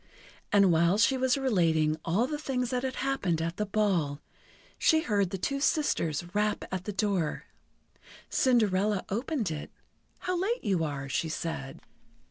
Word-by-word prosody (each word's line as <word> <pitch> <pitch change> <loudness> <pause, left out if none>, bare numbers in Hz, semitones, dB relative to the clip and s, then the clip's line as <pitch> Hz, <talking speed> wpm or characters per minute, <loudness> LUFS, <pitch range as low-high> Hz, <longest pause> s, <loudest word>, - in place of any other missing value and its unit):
And 200 -3 +5
while 170 +4 +3
she 245 +5 +4
was 260 0 +2
relating 165 - +2
all 190 +9 +1
the 295 +2 -4
things 250 -4 -2
that 250 -1 0
had 260 0 -3
happened 195 -12 0
at 165 +2 -3
the 210 - -1
ball, 190 -9 0 0.6
she 315 0 +4
heard 205 - +1
the 195 - -3
two 275 +10 -2
sisters 175 - 0
rap 210 0 0
at 185 0 -3
the 210 - -2
door. 195 -5 -1 0.8
Cinderella 210 -5 +2
opened 230 - -1
it. 150 -1 -5 0.5
"How 365 - -1
late 465 +6 -1
you 185 -5 +1
are," 140 -3 -3
she 155 +5 -1
said. 155 -4 -5
200 Hz, 155 wpm, -29 LUFS, 165-250 Hz, 0.8 s, And